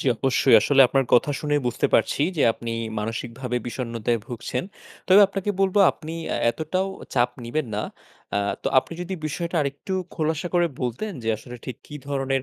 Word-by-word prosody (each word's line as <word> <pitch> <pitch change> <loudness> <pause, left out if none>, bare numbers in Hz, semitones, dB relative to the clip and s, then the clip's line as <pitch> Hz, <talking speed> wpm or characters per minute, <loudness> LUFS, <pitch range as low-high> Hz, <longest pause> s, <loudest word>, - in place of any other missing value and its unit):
জি - - -4
অবশ্যই। 130 -1 +3
আসলে 135 +5 +3
আপনার 135 +1 +2
কথা 125 +4 +4
শুনেই 145 -1 +1
বুঝতে 120 - +1
পারছি 115 - +2
যে 150 - +2
আপনি 115 +1 -6 0.3
মানসিকভাবে 115 +3 -4
বিষণ্ণতায় 120 -1 -2
ভুগছেন। 125 0 -4 0.5
তবে 190 +2 +8
আপনাকে 195 +1 -3
বলব 195 0 +2 0.2
আপনি 155 0 -9 0.2
আ - - 0
এতটাও 160 +9 -2 0.3
চাপ 125 -1 +3
নিবেন 135 +5 -2
না। 105 - -1 0.5
আ - - +3 0.2
তো - - 0
আপনি 130 - -3
যদি 185 +2 -4
বিষয়টা 170 +3 -3
আরেকটু 140 +6 -4 0.2
খোলাসা 160 +1 -1
করে 175 -1 +4
বলতেন 125 - -3
যে 115 - -3
আসলে 120 +3 -10
ঠিক 130 - -6
কি 150 - -10
ধরনের 135 -1 0
135 Hz, 175 wpm, -24 LUFS, 120-160 Hz, 0.5 s, তবে